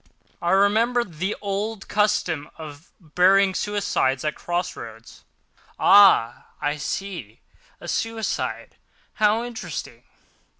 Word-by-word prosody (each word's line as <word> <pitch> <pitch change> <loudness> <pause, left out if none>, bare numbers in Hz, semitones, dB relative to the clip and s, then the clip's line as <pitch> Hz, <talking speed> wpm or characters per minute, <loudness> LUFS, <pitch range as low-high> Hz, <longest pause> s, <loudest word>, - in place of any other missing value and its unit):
I 175 - -1
remembered 205 -1 +2
the 190 +4 -1
old 205 +1 -4
custom 205 -8 0
of 155 0 -11
burying 190 +3 +3
suicides 190 -11 -1
at 150 - 0
cross 175 +1 -3
roads: 115 0 -12 0.5
"Ah! 195 - +5
I 145 +1 -1
see, 165 - -5 0.4
a - - -10
suicide. 225 -1 -3 0.4
How 215 +2 +3
interesting!" 240 -1 -7
195 Hz, 100 wpm, -23 LUFS, 150-210 Hz, 0.5 s, Ah